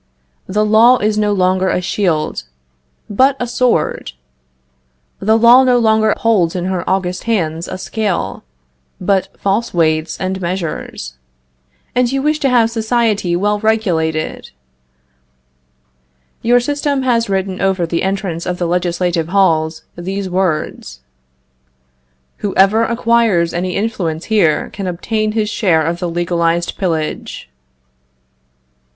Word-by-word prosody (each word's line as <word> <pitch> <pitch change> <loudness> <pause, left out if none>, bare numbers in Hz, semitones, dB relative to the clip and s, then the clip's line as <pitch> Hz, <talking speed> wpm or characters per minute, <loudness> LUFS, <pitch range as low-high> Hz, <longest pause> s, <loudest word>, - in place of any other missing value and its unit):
The 210 +3 0
law 225 +4 +5
is 210 -1 0
no 210 -1 +1
longer 185 -1 +1
a - - +1
shield, 165 - -1 0.6
but 260 +7 +3
a 245 - -1
sword! 245 - 0 1.1
The 220 +2 +3
law 235 +3 +7
no 250 -1 +3
longer 220 -2 +3
holds 195 -8 +1
in 180 -1 -2
her 185 -1 -2
august 185 -1 -1
hands 170 -7 -1
a 185 - -5
scale, 205 0 -3 0.6
but 190 0 +1
false 200 +1 -1
weights 155 -1 0
and 190 0 -3
measures! 165 - -5 0.7
And 250 -1 +1
you 270 0 -1
wish 305 +1 +1
to 275 - +1
have 235 -2 +3
society 220 -5 0
well 205 +3 0
regulated! 175 -8 -1 1.9
Your 245 +1 +4
system 285 +1 -1
has 235 -4 +1
written 190 -1 -2
over 190 -2 +1
the 165 0 -2
entrance 190 -3 -3
of 180 0 -2
the 175 - -2
legislative 175 -1 -1
halls 160 -4 +1
these 190 +3 -4
words: 160 - -2 1.4
"Whoever 205 +3 +2
acquires 230 -7 +1
any 180 +1 -2
influence 185 -7 -2
here 165 -8 +2
can 195 -2 -5
obtain 215 +5 -2
his 215 -1 0
share 165 -9 +2
of 170 +2 -2
the 175 -1 -2
legalized 170 0 -1
pillage." 160 - -3
190 Hz, 125 wpm, -16 LUFS, 170-220 Hz, 1.9 s, law